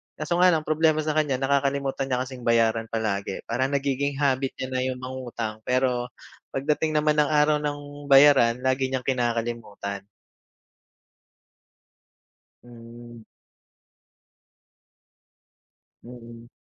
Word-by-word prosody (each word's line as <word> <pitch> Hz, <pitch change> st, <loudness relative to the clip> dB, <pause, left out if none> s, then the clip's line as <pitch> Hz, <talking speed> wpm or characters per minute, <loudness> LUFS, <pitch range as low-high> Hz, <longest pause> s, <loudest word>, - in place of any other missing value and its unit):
Kaso 155 Hz, +3 st, -2 dB
nga 180 Hz, 0 st, +6 dB
lang 160 Hz, -, +1 dB
problema 155 Hz, 0 st, +2 dB
sa 155 Hz, 0 st, -2 dB
kanya 145 Hz, -4 st, +1 dB
nakakalimutan 140 Hz, 0 st, 0 dB
niya 125 Hz, 0 st, 0 dB
kasing 130 Hz, -1 st, -10 dB
bayaran 115 Hz, -1 st, +2 dB
palagi, 100 Hz, -3 st, -2 dB
parang 130 Hz, +4 st, -1 dB
nagiging 140 Hz, 0 st, -1 dB
habit 135 Hz, -1 st, +1 dB
niya 130 Hz, -, -4 dB
na 130 Hz, 0 st, -1 dB
yung 130 Hz, -1 st, -3 dB
mangutang. 120 Hz, -4 st, -6 dB
Pero 125 Hz, -1 st, 0 dB, 0.4 s
pag 135 Hz, -, -2 dB
dating 155 Hz, +1 st, 0 dB
naman 150 Hz, 0 st, +2 dB
ng 150 Hz, -1 st, +3 dB
araw 150 Hz, 0 st, +3 dB
ng 145 Hz, -1 st, -6 dB
bayaran 135 Hz, -4 st, +6 dB
lagi 130 Hz, 0 st, +1 dB
niyang 130 Hz, -1 st, -3 dB
kinakalimutan. 115 Hz, -5 st, -3 dB, 2.6 s
Hmm. 120 Hz, -1 st, -13 dB, 2.8 s
Mm. 120 Hz, -1 st, -12 dB
130 Hz, 110 wpm, -25 LUFS, 120-145 Hz, 2.8 s, nga